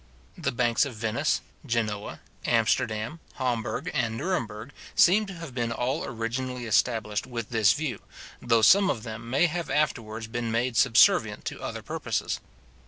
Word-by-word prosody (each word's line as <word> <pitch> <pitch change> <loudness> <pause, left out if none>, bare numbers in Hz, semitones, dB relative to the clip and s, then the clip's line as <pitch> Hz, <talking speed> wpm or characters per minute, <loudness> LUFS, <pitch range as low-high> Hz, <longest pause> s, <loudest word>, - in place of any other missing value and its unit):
The - - -2
banks 120 -1 +2
of 140 -5 -4
Venice, 110 +7 0 0.2
Genoa, 110 -6 -2 0.2
Amsterdam, 110 +9 +1 0.2
Hamburg, 125 +6 -2
and 115 -3 0
Nuremberg, 115 - -3 0.2
seem 205 +4 +5
to 195 - -7
have 165 -6 -8
been 120 -2 -1
all 125 +3 -1
originally 125 +1 -3
established 110 -1 +1
with 115 -3 -5
this 110 -3 +4
view, 145 -7 -3 0.4
though 115 -2 +3
some 195 - +6
of 115 - -1
them 115 0 -7
may 135 +7 +3
have 170 0 -2
afterwards 115 -7 -1
been 115 +1 -3
made 120 +2 0
subservient 115 -1 +4
to - - -5
other - - -5
purposes. - - -2
120 Hz, 150 wpm, -27 LUFS, 110-135 Hz, 0.4 s, some